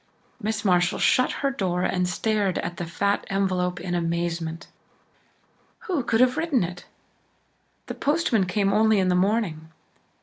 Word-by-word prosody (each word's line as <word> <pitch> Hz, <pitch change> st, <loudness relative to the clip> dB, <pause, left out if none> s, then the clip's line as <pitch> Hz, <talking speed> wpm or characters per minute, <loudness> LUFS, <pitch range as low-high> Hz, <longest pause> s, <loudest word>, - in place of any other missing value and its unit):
Miss 220 Hz, 0 st, -2 dB
Marshall 180 Hz, -1 st, +2 dB
shut 255 Hz, -, +3 dB
her 275 Hz, -, +2 dB
door 180 Hz, -8 st, -1 dB
and 180 Hz, -1 st, 0 dB
stared 205 Hz, +1 st, 0 dB
at 175 Hz, -, -4 dB
the 175 Hz, -, -4 dB
fat 200 Hz, +4 st, 0 dB
envelope 185 Hz, -2 st, 0 dB
in 180 Hz, -1 st, -4 dB
amazement. 170 Hz, -1 st, -2 dB, 1.2 s
Who 375 Hz, -, -1 dB
could 230 Hz, 0 st, +1 dB
have 255 Hz, 0 st, +3 dB
written 315 Hz, -, +1 dB
it? 175 Hz, +1 st, -6 dB, 1.0 s
The -, -, -5 dB
postman 280 Hz, -, +1 dB
came 195 Hz, +2 st, +1 dB
only 220 Hz, 0 st, +4 dB
in 185 Hz, -1 st, +2 dB
the 180 Hz, -, +2 dB
morning. 180 Hz, -5 st, 0 dB
190 Hz, 145 wpm, -24 LUFS, 175-220 Hz, 1.2 s, only